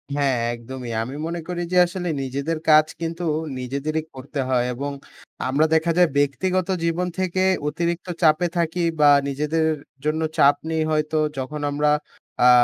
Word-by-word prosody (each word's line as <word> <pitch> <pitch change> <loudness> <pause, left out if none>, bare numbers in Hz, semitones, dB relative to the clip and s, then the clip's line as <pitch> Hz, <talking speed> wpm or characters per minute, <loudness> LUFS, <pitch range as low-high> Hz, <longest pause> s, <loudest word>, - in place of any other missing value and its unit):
হ্যাঁ, 140 -3 +1 0.2
একদমই। 120 0 -7
আমি 130 +4 -7
মনে 170 0 -3
করি 175 -1 -3
যে, 180 - +2
আসলে 175 0 -4
নিজেদের 140 +5 -2
কাজ 155 0 +7 0.2
কিন্তু 165 +1 -3 0.4
নিজেদেরই 140 +5 -2
করতে 140 +2 -6
হয়। 125 -1 +2
এবং 140 +3 -4 0.6
আমরা 150 +4 +3
দেখা 165 +1 +2
যায় 180 -2 +5
ব্যক্তিগত 180 +6 +1 0.2
জীবন 170 +2 0
থেকে 185 0 0 0.2
অতিরিক্ত 170 +4 -2
চাপে 160 +2 +4
থাকি 170 +1 0 0.2
বা 145 -1 +7 0.2
নিজেদের 150 +3 0 0.4
জন্য 155 +1 0 0.2
চাপ 140 +1 +6 0.2
নেই 160 -1 +1
হয়তো, 155 0 0 0.2
যখন 145 +3 -4
আমরা 150 +1 +2 0.5
আ 125 - +8
155 Hz, 150 wpm, -23 LUFS, 140-170 Hz, 0.6 s, আ